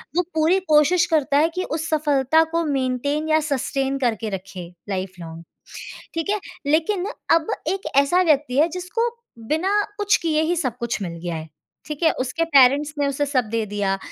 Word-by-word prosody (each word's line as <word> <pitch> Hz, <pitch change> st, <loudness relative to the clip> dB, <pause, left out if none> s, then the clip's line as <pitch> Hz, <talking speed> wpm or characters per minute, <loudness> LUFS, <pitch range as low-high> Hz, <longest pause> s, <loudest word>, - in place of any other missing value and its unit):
वो 360 Hz, -, +3 dB
पूरी 320 Hz, +4 st, +3 dB
कोशिश 310 Hz, +4 st, +4 dB
करता 285 Hz, -2 st, +2 dB
है 315 Hz, +3 st, +4 dB
कि 370 Hz, -, -1 dB
उस 315 Hz, 0 st, -4 dB
सफलता 300 Hz, 0 st, +3 dB
को 335 Hz, 0 st, 0 dB
मेंटेन 285 Hz, +2 st, -1 dB
या 315 Hz, 0 st, +4 dB
सस्टेन 275 Hz, 0 st, -1 dB
करके 230 Hz, -3 st, -1 dB
रखे 190 Hz, -2 st, -7 dB, 0.2 s
लाइफ 185 Hz, -1 st, -3 dB
लॉन्ग 165 Hz, -1 st, -9 dB, 0.7 s
ठीक 330 Hz, +1 st, -3 dB
है, 420 Hz, -, +1 dB, 0.3 s
लेकिन 330 Hz, +6 st, +1 dB, 0.3 s
अब 325 Hz, -1 st, +1 dB, 0.2 s
एक 390 Hz, +1 st, -2 dB
ऐसा 280 Hz, +6 st, +4 dB
व्यक्ति 290 Hz, -6 st, +1 dB
है 315 Hz, -, +5 dB
जिसको 365 Hz, +7 st, -2 dB, 0.4 s
बिना 320 Hz, +5 st, 0 dB, 0.3 s
कुछ 410 Hz, -1 st, +3 dB
किए 310 Hz, -2 st, +1 dB
ही 340 Hz, +2 st, 0 dB
सब 255 Hz, -8 st, -2 dB
कुछ 235 Hz, -2 st, -2 dB
मिल 175 Hz, -3 st, -4 dB
गया 175 Hz, -1 st, -3 dB
है, 160 Hz, 0 st, -7 dB, 0.4 s
ठीक 300 Hz, +1 st, -6 dB
है। 320 Hz, -, +5 dB
उसके 330 Hz, +6 st, -1 dB
पेरेंट्स 285 Hz, 0 st, +4 dB
ने 285 Hz, -, +1 dB
उसे 285 Hz, +1 st, -1 dB
सब 260 Hz, -4 st, +1 dB
दे 225 Hz, -1 st, 0 dB
दिया 200 Hz, -1 st, -1 dB
290 Hz, 185 wpm, -22 LUFS, 250-325 Hz, 0.7 s, है